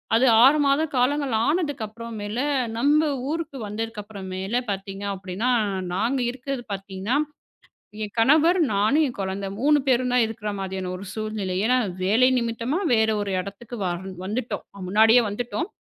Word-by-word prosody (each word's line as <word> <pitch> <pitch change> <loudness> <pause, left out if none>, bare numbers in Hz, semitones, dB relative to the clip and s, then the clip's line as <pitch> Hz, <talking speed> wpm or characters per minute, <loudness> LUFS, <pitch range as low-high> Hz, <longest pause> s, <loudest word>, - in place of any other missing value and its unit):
அது 240 +3 +4 0.2
6 295 +3 +6
மாத 275 +2 +3 0.2
காலங்கள் 270 +1 +1
ஆனதுக்கு 295 -6 0
அப்புறம் 230 +2 -8
மேல, 210 +4 -4 0.4
நம்ம 290 +5 +4 0.3
ஊருக்கு 320 -3 -3
வந்ததுக்கு 220 +1 -4
அப்பறம், 200 -2 -9
மேல 190 +4 -3 0.2
பாத்தீங்கன்னா 195 +1 -4
அப்படினா, 190 +6 -3 0.4
நாங்க 230 +8 0
இருக்குறது 265 0 -5
பாத்தீங்கன்னா 195 +4 -3 0.9
என் 205 - -6
கணவர், 310 +9 +5 0.2
நானும், 215 +11 +3
என் 245 - -6
குழந்த 195 +1 -3
3 295 +3 +4
பேரும் 250 -1 +2
இருக்கிற 220 -1 -5
மாதிரியான 190 -1 -4
ஒரு 190 - -8
சூழ்நிலை. 215 -4 -3
ஏன்னா, 250 +2 +3 0.3
வேலை 225 +7 +4
நிமித்தமா 235 +6 -1
வேற 220 -1 +3
ஒரு 200 -1 -3
இடத்துக்கு 200 +6 -7
வா 180 - 0 0.3
வந்துட்டோம், 225 +5 -3 0.2
முன்னாடியே 220 +5 +6
வந்துட்டோம். 245 - -3
225 Hz, 145 wpm, -24 LUFS, 200-260 Hz, 0.9 s, 6